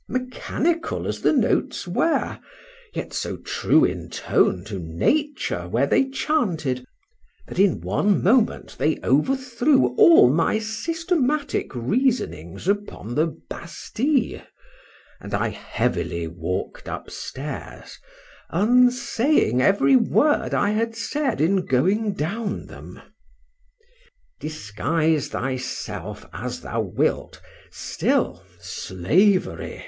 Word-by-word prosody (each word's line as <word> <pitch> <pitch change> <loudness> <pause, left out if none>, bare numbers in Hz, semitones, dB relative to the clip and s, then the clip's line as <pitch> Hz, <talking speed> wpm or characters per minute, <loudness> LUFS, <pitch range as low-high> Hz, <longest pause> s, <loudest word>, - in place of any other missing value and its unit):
Mechanical 275 +6 -2
as - - -3
the - - +4
notes - - +1
were, 330 - 0 0.5
yet - - -6
so - - -3
true 160 - +2
in 90 -1 -3
tune 90 +1 +1
to 105 -2 -5
nature 85 - -1
were 120 +9 +1
they 270 - +2
chanted, 170 - -1 0.6
that - - -6
in 195 -1 +3
one 205 -2 +1
moment 225 +4 +2
they 155 - +2
overthrew 245 - +2
all 165 -7 +8
my 165 - +2
systematic 295 - -1
reasonings 130 - -1
upon 200 - -2
the 155 +6 +2 0.2
Bastile; 245 - -2 0.8
and - - -4
I - - 0
heavily 85 -1 -2
walked 85 +2 -5
upstairs, 145 +3 -7 0.5
unsaying 250 - +3
every 200 - +4
word 285 +5 +2
I 205 - +2
had 225 +1 -1
said 270 +2 -2
in 180 +5 +2
going 195 - +1
down 200 +6 -3
them. - - -11 1.4
Disguise 155 +3 -1
thyself 130 0 -4
as - - -5
thou - - -2
wilt, - - -1 0.3
still, 90 +1 -1 0.2
Slavery! 95 - 0
195 Hz, 100 wpm, -23 LUFS, -, 1.4 s, all